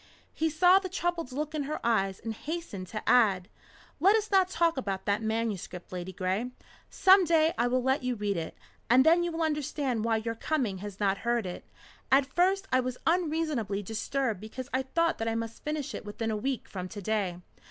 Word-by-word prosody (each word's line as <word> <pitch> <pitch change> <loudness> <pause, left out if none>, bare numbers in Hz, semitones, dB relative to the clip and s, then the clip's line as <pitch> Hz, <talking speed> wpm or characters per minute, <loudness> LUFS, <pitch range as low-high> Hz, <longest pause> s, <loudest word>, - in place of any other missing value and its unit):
He 320 +1 0
saw 360 +4 +5
the 380 -1 -6
troubled 345 -5 -2
look 300 +4 -3
in 295 -2 -2
her 305 - -2
eyes, 195 -5 +1
and 225 -1 -4
hastened 295 - -6
to 215 +3 -6
add: 195 -7 +4 0.5
"Let 390 +7 +5
us 430 -1 -1
not 380 -2 +4
talk 335 -2 +2
about 195 -8 -3
that 205 +1 +1
manuscript, 220 -5 -3
Ladygray. 185 +5 -2 0.4
Some 385 0 +6
day 325 -1 +3
I 240 - +1
will 250 +1 +1
let 265 +2 +2
you 250 -1 -1
read 205 -2 -1
it, 165 -2 -5 0.3
and 255 +3 +6
then 335 +2 +6
you 345 0 -1
will 325 0 -2
understand 285 -6 -1
why 225 -1 +2
your 230 +1 -3
coming 230 -5 -1
has 200 0 -8
not 195 -1 +1
hurt 235 -2 0
it. 180 - -7 0.4
At 270 +1 +5
first 385 +2 +2
I 255 - +4
was 255 0 -2
unreasonably 310 - 0
disturbed 225 +1 -2
because 255 +4 -7
I 260 - +2
thought 335 +6 0
that 225 - -2
I 225 - 0
must 230 0 -5
finish 300 -2 -3
it - - -6
within 220 +2 -3
a - - -1
week 260 +4 -2
from 185 -2 -6
to 205 0 -7
day. 200 -4 -1
250 Hz, 205 wpm, -29 LUFS, 210-320 Hz, 0.5 s, Some